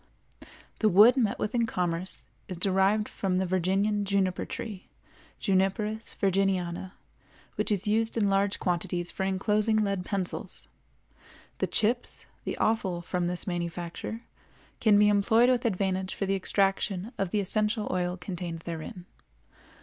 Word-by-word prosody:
The 215 - +4
wood 210 +7 +7
met 225 -6 +1
with 210 - -2
in 235 -2 +2
commerce 180 -1 -3 0.2
is 185 - -6
derived 195 +3 +2
from 185 -2 -1
the 190 - +1
Virginian 190 +3 +1
juniper 195 -2 0
tree, 205 -5 -7 0.5
Juniperus 205 +3 0
virginiana, 190 -2 0 0.6
which - - -1
is 205 +1 0
used 225 +2 +1
in 210 -3 +3
large 195 0 +2
quantities 175 -1 -1
for 190 - -2
inclosing 210 +3 +1
lead 200 -3 0
pencils. 190 -1 -4 0.9
The - - +1
chips, 235 +3 +1 0.2
the - - -3
offal 190 -6 0
from 175 0 -1
this 175 0 -2
manufacture, 175 +4 -4 0.6
can 210 -2 +5
be 210 0 +6
employed 220 +4 +4
with 245 -1 0
advantage 190 -3 -1
for 195 - -2
the 195 - 0
extraction 195 +1 0
of 195 - 0
the 210 - 0
essential 210 +2 0
oil 180 0 -1
contained 175 -2 -5
therein. 170 +2 -7
195 Hz, 140 wpm, -28 LUFS, 180-210 Hz, 0.9 s, wood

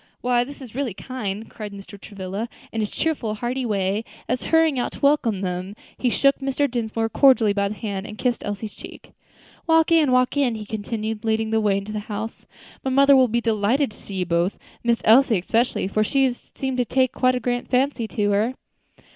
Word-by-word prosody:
Why 245 -1 +2
this 275 +2 -10
is 240 - -11
really 255 -6 -2
kind," 220 -4 -5
cried 210 -2 -8
Mr. 200 0 -11
Travilla, 200 +3 -5 0.2
in 225 - -3
his 210 - -1
cheerful, 255 -10 -1
hearty 245 +3 -2
way, 200 0 0 0.2
as, 250 0 -1
hurrying 320 -4 +3
out 245 - -2
to - - -10
welcome 280 -9 +2
them, 185 +1 -3 0.2
he 250 - 0
shook 275 +3 +3
Mr. 275 +1 0
Dinsmore 225 -3 -2
cordially 235 -4 +4
by 200 0 +1
the 210 - -5
hand, 200 -2 -4
and 215 - -9
kissed 245 0 -1
Elsie's 205 +1 -5
cheek. - - -12 0.6
"Walk 325 0 +4
in, 315 -5 +4
walk 255 +1 +3
in," 265 -5 +2
he 215 -1 -6
continued, 220 0 -4
leading 220 0 0
the 220 0 +2
way 205 -2 +2
into 200 +2 -5
the 215 - -3
house, 220 +2 -5 0.4
"my 265 - -1
mother 275 +1 +6
will 260 -1 +6
be 235 +1 0
delighted 225 +4 +1
to - - -16
see 200 - -9
you 185 -1 -1
both; 170 +3 0 0.3
Miss 235 -1 +1
Elsie 230 0 +6
especially, 225 +3 0
for 215 +2 +1
she 265 +3 +2
seems 265 +1 -5
to - - +3
have 245 - -2
taken 260 -1 +2
a - - -13
very 255 0 +4
great 245 +1 -2
fancy 250 -2 +1
to 205 -2 0
her." 215 +5 +1
225 Hz, 210 wpm, -23 LUFS, 210-255 Hz, 0.6 s, mother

